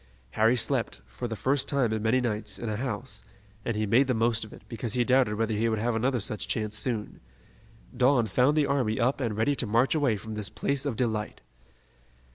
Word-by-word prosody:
Harry 110 - +3
slept, 110 - -1
for 65 - -6
the 115 - -4
first 135 +5 0
time 130 -6 +1
in 110 - -2
many 110 +4 +2
nights, 110 -4 -2
in 115 - -4
a 105 - -1
house, 115 -3 -4 0.4
and 115 -1 -2
he 110 - 0
made 120 +6 +4
the 125 - +1
most 115 0 +2
of 110 - -10
it, - - -13
because 115 0 -4
he 125 - +2
doubted 125 -3 +3
whether 110 +1 0
he 110 +2 +1
would 110 - 0
have 115 +3 0
another 125 +3 +1
such 105 +1 -4
chance 110 -1 -2
soon. 110 -2 -3 0.8
Dawn 125 -1 +4
found 125 +8 +2
the 150 - +4
army 130 -6 0
up 130 +4 +1
and 115 -4 -2
ready 125 +6 +2
to 125 - -2
march 115 +5 +3
away 140 -9 +2
from 110 +2 -8
this 105 -2 -4
place 140 0 -1
of 130 - -2
delight. 110 -3 -2
115 Hz, 220 wpm, -28 LUFS, 110-130 Hz, 0.8 s, made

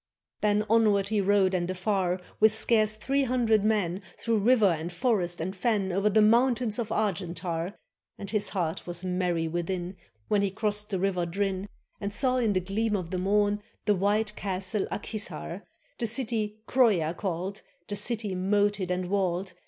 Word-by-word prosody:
Then 210 0 +2
onward 210 -3 +3
he 215 -2 +1
rode 195 -1 +3
and 175 -1 0
afar. 185 -1 0 0.2
With 220 0 +5
scarce 215 -1 +2
three 270 +6 0
hundred 230 -4 +2
men, 200 -4 +1 0.2
Through 230 -2 0
river 215 -2 +4
and 160 +3 -5
forest 180 -4 0
and 185 +4 -3
fen, 195 -1 0
O'er 195 +3 +2
the 215 +1 +4
mountains 235 0 +3
of 225 -2 -2
Argentar; 180 -3 -2 0.4
And 200 0 -6
his 210 -2 0
heart 170 -4 -3
was 175 0 -5
merry 180 -3 0
within, 175 +2 -3 0.3
When 205 -1 +2
he 200 - +1
crossed 210 +1 -1
the 195 - -1
river 180 -2 0
Drin, 195 +2 -2 0.3
And 200 0 -3
saw 255 +4 +2
in 230 -4 +2
the 185 - +2
gleam 210 +4 -1
of 180 -4 -4
the 185 - -1
morn 205 +2 +2 0.2
The 210 - +4
White 210 +2 +1
Castle 195 +1 -2
Ak - - -4
Hissar, 215 -2 -5 0.3
The 235 - 0
city 220 -3 -1
Croia 205 -11 +3
called, 190 +2 -4 0.3
The 205 - -3
city 210 -1 -1
moated 200 0 +1
and 180 0 -1
walled. 185 -1 -1
200 Hz, 170 wpm, -28 LUFS, 185-215 Hz, 0.4 s, With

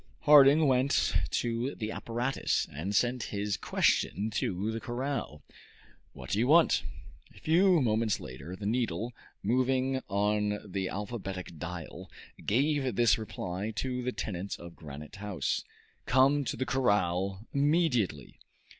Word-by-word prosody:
Harding 150 0 +7
went 130 +1 +2 0.2
to 120 +3 -1
the 110 -1 -4
apparatus, 120 +5 -1
and 90 +8 -3
sent 120 +3 +1
this 100 -1 -2
question 100 +4 +1
to 100 0 -1
the 115 - -3
corral: 120 - -4 0.7
"What 65 -2 -9
do 100 - +1
you 120 - +2
want?" 160 +3 +5 0.5
A - - -14
few 175 +2 +4
moments 110 -2 +1
later 65 +8 -8
the 100 - -8
needle, 115 0 -1 0.3
moving 130 +3 +1
on 105 +1 +1
the 95 -1 -3
alphabetic 95 -5 -6
dial, 85 -1 -7 0.3
gave 135 +1 +1
this 115 0 +4
reply 95 -1 -4
to 125 +3 -2
the 125 +1 -2
tenants 100 -4 -4
of 85 0 -11
Granite 75 +1 -10
House: 100 -3 -2 0.4
"Come 135 +2 +4
to - - -3
the 130 - -1
corral 100 -5 0
immediately." 140 - +1
110 Hz, 130 wpm, -30 LUFS, 95-130 Hz, 0.7 s, Harding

